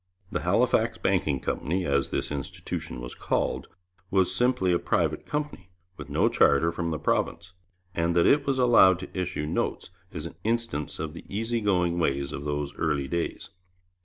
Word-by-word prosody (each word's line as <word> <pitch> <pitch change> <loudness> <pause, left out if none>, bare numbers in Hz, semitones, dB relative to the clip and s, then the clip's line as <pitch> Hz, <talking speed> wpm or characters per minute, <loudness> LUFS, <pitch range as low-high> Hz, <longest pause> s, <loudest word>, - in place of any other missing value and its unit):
The - - -1
Halifax - - +2
Banking 70 -3 +1
Company, 90 +6 -1
as 70 -1 +1
this - - -2
institution 70 -3 -5
was - - -7
called, - - -1 0.4
was 95 -2 +2
simply 125 -8 +2
a 85 - +2
private - - 0
company, 150 -11 -4 0.3
with - - -9
no - - +3
charter 80 +4 +4
from 85 0 -3
the 80 - -1
province, 85 +3 -1 0.4
and 85 +1 0
that 85 - +4
it 145 -1 +4
was 135 -1 +1
allowed 115 -8 +6
to 95 - -9
issue 90 -4 -2
notes 75 - -2 0.2
is 80 -3 -5
an 85 - -8
instance 115 -9 -1
of 75 -1 -4
the - - -9
easy 115 +3 -1
going 90 -4 +1
ways 70 -4 0
of 70 - -6
those 75 0 -2
early 70 -4 0
days. 85 +5 -3
85 Hz, 170 wpm, -27 LUFS, 75-100 Hz, 0.4 s, allowed